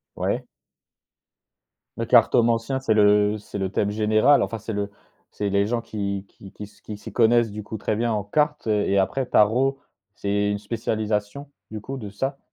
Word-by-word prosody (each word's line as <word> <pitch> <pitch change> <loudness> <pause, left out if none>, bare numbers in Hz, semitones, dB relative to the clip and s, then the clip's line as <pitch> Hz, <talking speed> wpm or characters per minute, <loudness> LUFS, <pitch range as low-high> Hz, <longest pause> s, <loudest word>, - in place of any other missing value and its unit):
Ouais. - - -2 1.5
Le - - -2
cartomancien, 115 +3 +3
c'est 130 -4 +1
le 105 0 +4
c'est 105 - -8
le 95 -1 -2
thème 100 - 0
général, 110 +6 +3
enfin 115 - -4
c'est 110 +1 -6
le 100 0 -3 0.4
c'est 105 -1 -3
les 100 0 +2
gens 115 +2 -1
qui 100 -3 -4
qui 95 - -14
qui - - -10
s 105 - -13
qui 105 - -7
s'y - - -10
connaissent 120 -1 +3
du 105 +1 -6
coup 110 - -6
très 105 - -2
bien 115 +2 0
en 105 -1 -1
cartes, 150 +6 0
heu 105 -1 +2
et 100 - +2
après 130 +8 0
tarot 125 +5 +2 0.3
c'est - - -29
c'est 100 0 +1
une 100 - -2
spécialisation 110 +4 -3 0.2
du 110 -1 -6
coup 135 +5 -6
de 105 -5 -7
ça? 135 +7 -3
105 Hz, 190 wpm, -24 LUFS, 105-115 Hz, 1.5 s, le